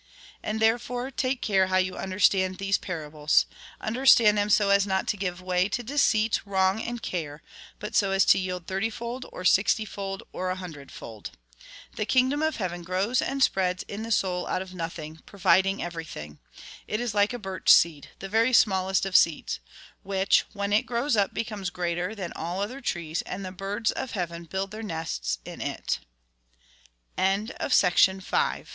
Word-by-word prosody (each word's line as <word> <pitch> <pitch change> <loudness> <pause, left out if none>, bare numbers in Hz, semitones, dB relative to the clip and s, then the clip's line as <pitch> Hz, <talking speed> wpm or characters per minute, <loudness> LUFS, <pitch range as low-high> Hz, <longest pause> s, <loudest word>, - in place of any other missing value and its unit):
And, 215 +1 -3
therefore, 245 +3 0
take 260 0 -1
care 190 -3 +3
how 185 0 +2
you 185 0 0
understand 185 -1 +1
these 195 0 0
parables. 150 -4 0 0.3
Understand 230 -2 +5
them 205 0 +1
so 205 -1 +4
as 200 0 +4
not 190 -1 0
to - - +1
give 185 -2 -4
way 185 +1 +1
to 245 +3 -2
deceit, 225 -4 +2
wrong, 190 +1 +1
and 240 0 -5
care; 155 -4 -4 0.3
but 210 - -7
so 200 - +3
as 195 0 +3
to - - +5
yield 180 -2 -4
thirtyfold, 225 +6 -3
or 185 - -8
sixtyfold, 195 0 +1
or 185 0 -3
a 185 - -1
hundredfold. 145 - -9 0.7
The 215 - -2
kingdom 260 +5 +2
of 315 0 +1
heaven 175 -4 -4
giows 190 +8 0
and 275 0 0
spreads 180 -4 +1
in 205 +2 -7
the 225 - -5
soul 180 -4 0
out 185 - -1
of 185 -1 -13
nothing, 165 -2 -6
providing 195 0 +2
e\erything. 160 - -7 0.5
It 215 - -2
is 240 -3 -2
like 205 +1 +3
a 245 - -4
birch 190 -5 -4
seed, 155 -4 +4
the 195 - -7
very 225 +5 +2
smallest 190 -4 +3
of 195 -1 -4
seeds, 165 - +3 0.4
which, 195 0 +2
when 200 0 -2
it 210 - +2
grows 240 +2 0
up, 200 -2 +2
becomes 210 -5 -4
greater 175 +3 -2
than 185 -5 -5
all 175 +3 -4
other 240 +7 -4
trees, 165 - -2
and 190 +1 -6
the 185 - -5
birds 200 +4 -2
of 260 - -5
heaven 170 -3 -4
build 190 +4 -4
195 Hz, 160 wpm, -26 LUFS, 180-215 Hz, 0.7 s, Understand